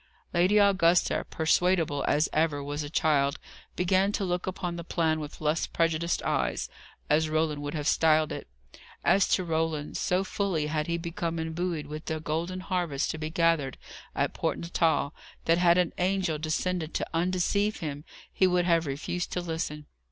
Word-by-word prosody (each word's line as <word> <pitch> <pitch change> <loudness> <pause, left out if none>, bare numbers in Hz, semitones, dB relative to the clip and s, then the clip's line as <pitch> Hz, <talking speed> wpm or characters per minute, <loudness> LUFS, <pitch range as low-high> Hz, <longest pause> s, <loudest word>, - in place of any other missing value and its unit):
Lady 180 +4 +4
Augusta 190 -4 +3
persuadable 160 -2 +2
as 150 +2 +3
ever 155 -2 +1
was 145 +1 -3
a 145 - -5
child 145 -3 +2 0.4
began 185 +2 +2
to 205 - -1
look 180 0 -2
upon 180 -2 -3
the 170 - -6
plan 160 -1 0
with 150 -1 -7
less 155 +1 0
prejudiced 165 +1 0
eyes - - -1 0.4
as 155 +1 +2
Roland 155 -1 0
would 145 +2 -4
have 150 -1 -3
styled 155 -1 +3
it. 145 -1 -6 0.6
As 195 0 +4
to 185 - +2
Roland, 160 -3 -1
so 180 +1 +1
fully 190 -5 -1
had 150 0 -1
he 170 0 0
become 170 0 -3
imbued 160 -1 -2
with 155 +2 -7
the 160 -1 -2
golden 165 +4 -3
harvest 175 -7 -1
to 160 - -6
be 155 0 -3
gathered 160 -5 +1 0.4
at - - 0
Port - - -1
Natal, 165 -3 +1 0.3
that 165 +1 +3
had 175 -1 +5
an 180 -2 +1
angel 180 -4 0
descended 160 +1 -2
to - - 0
undeceive 185 +5 +1
him, 145 -2 -5 0.3
he 185 - +4
would 180 -1 +2
have 165 -2 +2
refused 155 +6 -3
to - - -1
listen. 160 -3 -4
165 Hz, 170 wpm, -28 LUFS, 155-180 Hz, 0.6 s, had